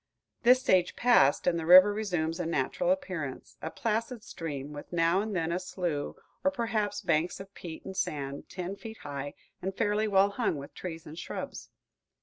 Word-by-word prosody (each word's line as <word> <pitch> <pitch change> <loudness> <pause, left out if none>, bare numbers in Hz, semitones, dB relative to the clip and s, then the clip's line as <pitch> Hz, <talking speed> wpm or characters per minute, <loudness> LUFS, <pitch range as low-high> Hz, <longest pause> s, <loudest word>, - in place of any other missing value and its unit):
This 250 +2 +6
stage 180 -6 +3
passed, 240 - +4
and 170 -1 +2
the 160 - -4
river 185 +3 +9
resumes 175 -6 -1
a 175 - -1
natural 165 - 0
appearance, 185 - -3
a 160 - -3
placid 225 +3 -2
stream, 150 -8 -6
with 145 - -9
now 170 +2 +3
and 215 -1 -3
then 165 -1 0
a 175 - 0
slough, 175 -5 -3 0.3
or 280 - +5
perhaps 220 -6 -1
banks 170 -2 +1
of 195 +1 -10
peat 165 -2 -8
and 190 - -6
sand, 140 -6 -3
ten 185 +1 -4
feet 220 +3 -9
high 140 0 -5 0.3
and 190 +1 -4
fairly 215 0 +1
well 200 0 +4
hung 225 -4 0
with 140 0 -9
trees 165 -3 -7
and 155 +3 -8
shrubs. - - -6
185 Hz, 180 wpm, -30 LUFS, 160-210 Hz, 0.3 s, river